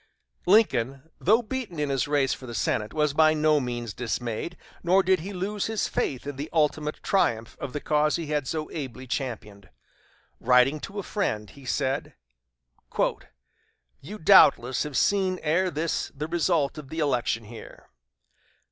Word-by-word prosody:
Lincoln, 155 - +2
though 220 +6 +3
beaten 225 -6 -5
in 145 -2 0
his 135 -1 0
race 140 -3 +2
for 130 - -9
the 120 - -6
Senate, 105 0 -1
was 150 -2 +1
by 155 +1 +4
no 155 0 +3
means 120 -4 -4
dismayed, 120 +6 -4 0.2
nor 185 +3 +4
did 190 -1 +3
he 190 +6 -6
lose 200 +2 -2
his 220 -2 -1
faith 130 -1 -2
in 145 -1 -6
the 145 +3 -5
ultimate 150 -1 0
triumph 115 - +1
of 135 - -5
the 145 - -3
cause 150 0 +2
he 165 - -3
had 150 -3 -2
so 155 +1 -3
ably 130 -4 -6
championed. 110 -7 -5 0.7
Writing 125 +4 +4
to 195 +7 -8
a 200 - -2
friend, 110 - -2
he 140 -2 -15
said: 135 +2 -2 1.9
"You 200 +10 -8
doubtless 135 - +5
have 150 -3 -2
seen 190 -2 +2
ere 175 +4 +2
this 160 0 -2
the 150 +2 -4
result 165 -4 0
of 140 -3 -11
the 160 - -7
election 125 -6 0
here. 115 +2 -12
150 Hz, 160 wpm, -26 LUFS, 130-175 Hz, 1.9 s, doubtless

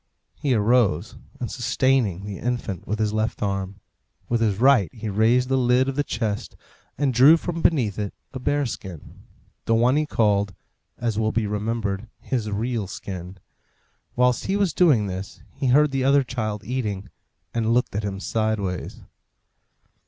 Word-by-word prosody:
He 135 -4 0
arose, 110 -5 +2 0.2
and - - -4
sustaining 115 -8 +1
the 100 -2 -6
infant 120 -7 -3
with 105 - -1
his 105 -1 0
left 110 0 -1
arm, 100 -1 -2 0.5
with 120 -1 +1
his 105 -4 +1
right 125 - +4
he 110 -1 -6
raised 115 +5 +3
the 135 0 +2
lid 125 +1 +3
of 135 - -2
the 145 - +1
chest 110 -6 -3 0.4
and 140 -3 +1
drew 135 +7 +7
from 165 0 -4
beneath 120 - +2
it 105 -2 -2 0.2
a 130 - -5
bear 145 +2 0
skin 95 - -8 0.4
the 115 - +2
one 125 +5 +3
he 155 0 +1
called, 100 - +1 0.4
as 115 -3 -1
will 110 0 +1
be 110 -1 0
remembered, 105 0 -2
his 115 -5 -2
real 110 0 -2
skin. 90 -1 -7 0.8
Whilst 125 0 +2
he 195 - +1
was 195 -6 +1
doing 145 - +4
this 95 0 -6
he 135 0 -2
heard 145 +3 +4
the 135 -1 0
other 140 +1 +4
child 110 -5 -3
eating, 105 -5 -3 0.4
and 115 -1 0
looked 120 -3 +1
at 105 - 0
him 100 -1 -3
sideways. 105 -4 -2
115 Hz, 165 wpm, -24 LUFS, 100-130 Hz, 0.8 s, drew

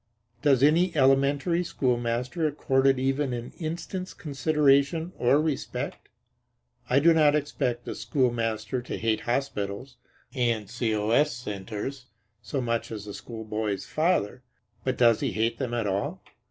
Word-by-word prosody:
Does 135 -3 +4
any 165 +4 +4
elementary 140 +5 +3
schoolmaster 125 +2 -1
accord 135 -2 +1
it 135 -1 +4
even 135 +1 0
an 120 0 -6
instant's 175 +3 -5
consideration 150 +2 +2
or 125 +4 +4
respect? 155 -3 -3 0.8
I 125 - +3
do 165 +4 +6
not 150 -2 +4
expect 135 -5 -1
the - - -4
schoolmaster 115 -1 -1
to 120 - -5
hate 110 -1 0
hospitals 120 -2 -2 0.4
and 120 -5 0
C.O.S. 115 +5 +1
centers 115 +3 -6 0.3
so 105 +6 -3
much 115 -1 -2
as 105 -2 -6
the 100 - -7
schoolboy's 110 -3 -4
father; 155 - 0 0.4
but 130 -1 -1
does 115 -3 +5
he 135 -5 -1
hate 115 +2 0
them 130 -3 -2
at 115 -2 -1
all? 100 0 -2
130 Hz, 135 wpm, -27 LUFS, 115-145 Hz, 0.8 s, do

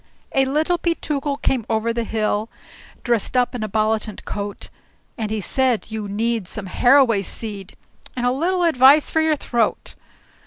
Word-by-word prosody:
A 270 0 +3
Little 310 +6 0
Peetookle 295 -4 -2
came 255 -4 +1
over 225 +1 0
the 235 0 -1
hill, 215 0 -1 0.5
Dressed 240 0 0
up 245 0 +2
in 245 - -4
a 215 - -3
bollitant 215 0 -1
coat; 205 -1 -5 0.5
And 220 -3 -3
he 220 0 -2
said, 245 +2 0
"You 215 -2 -4
need 220 0 -1
some 205 +1 -6
harroway 245 +1 +4
seed, 200 -1 -6 0.4
And 245 -1 -2
a 245 - +3
little 350 +7 0
advice 285 -2 +5
for 320 - +2
your 315 -1 +2
throat." 240 -5 -1
235 Hz, 160 wpm, -21 LUFS, 215-275 Hz, 0.5 s, advice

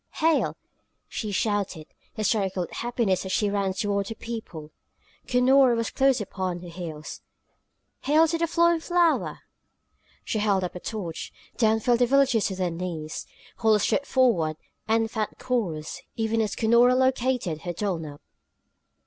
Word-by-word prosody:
"Hail!" 325 0 +2 0.5
she 215 -2 -4
shouted, 200 -6 -1 0.3
hysterical 200 -4 0
with - - -9
happiness 235 -6 -1
as 190 - -5
she 205 0 +1
ran 200 -1 0
toward 200 +1 -1
her 225 - -5
people. 195 -11 -7 0.6
Cunora 255 0 +5
was 230 0 -2
close 270 -2 +3
upon 185 -3 -4
her 175 - -9
heels. 165 -3 -7 0.8
"Hail 310 +3 +5
to 330 +1 -1
the 335 - +1
flowing 340 0 +3
flower!" 345 0 +1 0.8
She 220 - -1
held 200 -3 +2
up 180 - -3
a 180 - -7
torch. 180 -6 -5 0.2
Down 220 -1 +2
fell 240 +2 +3
the 245 0 +3
villagers 265 -4 +3
to 190 - -4
their 185 -2 -1
knees. 165 -3 -5 0.3
Holla 220 -2 +3
strode 280 +7 0
forward 175 - +2 0.3
and 225 0 +1
found 215 -2 -3
Corrus, 185 -12 -2
even 225 0 0
as 210 -2 -1
Cunora 235 +2 +4
located 255 -10 +1
her 175 - -4
Dulnop. 165 -6 -4
215 Hz, 150 wpm, -26 LUFS, 185-250 Hz, 0.8 s, Cunora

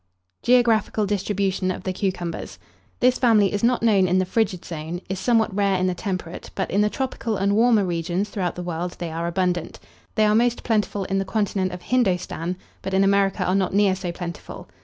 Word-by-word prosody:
GEOGRAPHICAL 230 -3 +3
DISTRIBUTION 195 -1 -1
OF 185 - -4
THE 185 - -2
CUCUMBERS. 180 -3 -3 0.4
This 250 0 +4
family 215 -6 +4
is 205 - -2
not 240 0 +2
known 200 -5 +4
in 180 +1 +2
the 185 - +2
frigid 190 -2 -1
zone, 165 +1 -5
is 190 -1 -3
somewhat 220 -1 +2
rare 200 -1 +2
in 185 - 0
the 185 - +1
temperate, 185 -3 -5
but - - -2
in 200 - +2
the 210 - +3
tropical 235 -3 -3
and 200 +1 +1
warmer 225 -2 +4
regions 175 +3 -1
throughout 185 -6 -3
the 180 - -5
world 175 0 -4
they 170 -2 -4
are 165 +1 -3
abundant. 180 -1 -1 0.4
They 215 -2 +4
are 210 - +3
most 240 +2 +2
plentiful 210 -3 0
in 195 +1 -1
the - - 0
continent 195 -2 -1
of 180 0 -8
Hindostan; 180 -7 0 0.2
but 190 - -3
in 195 - +4
America 195 -1 +2
are 185 - +1
not 190 -1 +1
near 200 -2 +4
so 185 -2 -4
plentiful. 170 -1 -7
195 Hz, 200 wpm, -23 LUFS, 180-210 Hz, 0.4 s, This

